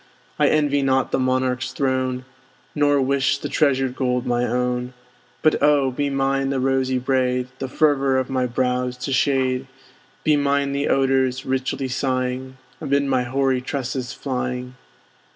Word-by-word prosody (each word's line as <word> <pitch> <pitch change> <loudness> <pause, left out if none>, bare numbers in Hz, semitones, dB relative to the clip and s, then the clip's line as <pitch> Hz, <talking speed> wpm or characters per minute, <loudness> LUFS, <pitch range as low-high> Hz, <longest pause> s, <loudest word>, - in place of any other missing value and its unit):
I - - +5
envy 145 -2 +2
not 135 -1 +1
the - - +1
monarch's 130 0 0
throne, 130 -2 -1 0.5
Nor 145 -1 +3
wish 140 +1 +1
the 145 - -5
treasured 135 -3 +1
gold 125 -2 0
my 120 0 +1
own. 125 +1 -1 0.5
But 155 - +3
oh! 145 -2 +3
be 140 +3 -1
mine 135 0 0
the 135 -1 0
rosy 130 0 +1
braid, 125 -1 0
The 135 - -3
fervor 135 -1 +2
of 130 -1 0
my 130 -1 0
brows 125 0 -1
to 125 +2 -3
shade; 130 -1 +1 0.6
Be 155 - +4
mine 140 0 +1
the 140 +1 -1
odors, 130 0 +1
richly 130 0 -1
sighing, 130 0 -2 0.2
Amid 140 -2 +1
my 135 -2 +1
hoary 130 0 +1
tresses 130 -2 -3
flying. 125 -1 -4
130 Hz, 150 wpm, -22 LUFS, 125-140 Hz, 0.6 s, I